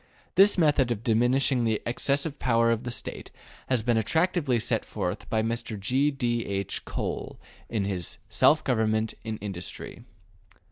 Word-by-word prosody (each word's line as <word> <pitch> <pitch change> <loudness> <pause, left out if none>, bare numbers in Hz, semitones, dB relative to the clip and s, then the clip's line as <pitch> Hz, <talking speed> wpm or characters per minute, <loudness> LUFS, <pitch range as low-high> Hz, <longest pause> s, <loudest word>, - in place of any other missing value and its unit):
This 200 +1 +6
method 145 -6 +3
of 115 -2 -2
diminishing 125 +3 +2
the 110 -2 +1
excessive 140 +4 -1
power 115 -1 +3
of 115 +1 -1
the - - -2
State 120 - -4 0.4
has 125 -4 +1
been 120 0 +2
attractively 160 - +1
set 115 - 0
forth - - -4
by 110 0 +1
Mr. 115 -2 -3
G. 130 +9 +2
D. 120 -4 -1
H. 100 -1 -3
Cole - - -4 0.3
in 105 -4 -1
his 95 -3 -3
``Self 155 +1 +4
Government 110 -3 +1
in 110 -1 -4
Industry.'' 95 -4 -6
120 Hz, 150 wpm, -27 LUFS, 110-135 Hz, 0.4 s, This